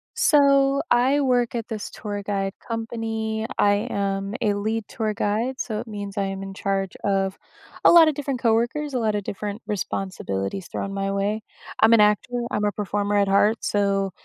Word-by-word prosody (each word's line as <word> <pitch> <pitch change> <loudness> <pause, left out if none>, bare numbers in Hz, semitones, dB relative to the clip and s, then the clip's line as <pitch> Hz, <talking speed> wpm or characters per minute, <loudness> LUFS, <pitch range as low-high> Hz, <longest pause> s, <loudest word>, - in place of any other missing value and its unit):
So, 275 -1 +4
I 260 +4 +4
work 245 -3 +1
at 230 0 -4
this 215 -2 -5
tour 205 -1 -5
guide 195 -1 -2 0.2
company. 225 -1 -3
I 205 +2 +2
am 195 0 -2
a 210 - +2
lead 215 +2 -2
tour 215 -2 -2
guide, 215 +6 -1
so 215 -3 -3
it - - -7
means 205 -1 -6
I 200 - +1
am 195 0 -4
in 195 0 -7
charge 195 -1 -2
of 195 -1 0 0.5
a - - +9
lot 330 -2 +8
of - - -1
different 275 -3 -3
coworkers, 240 +5 +1
a 250 - 0
lot 215 -2 0
of 205 - -2
different 205 +3 -5
responsibilities 185 - -3
thrown 195 0 -4
my 195 0 -2
way. 205 +2 -1 0.4
I'm 225 +1 +6
an 220 - +6
actor, 210 +4 +2 0.2
I'm 210 0 0
a 205 - 0
performer 205 +1 -1
at 200 -1 +3
heart, 205 +3 +3
so 195 -1 +1
210 Hz, 185 wpm, -24 LUFS, 200-230 Hz, 0.5 s, a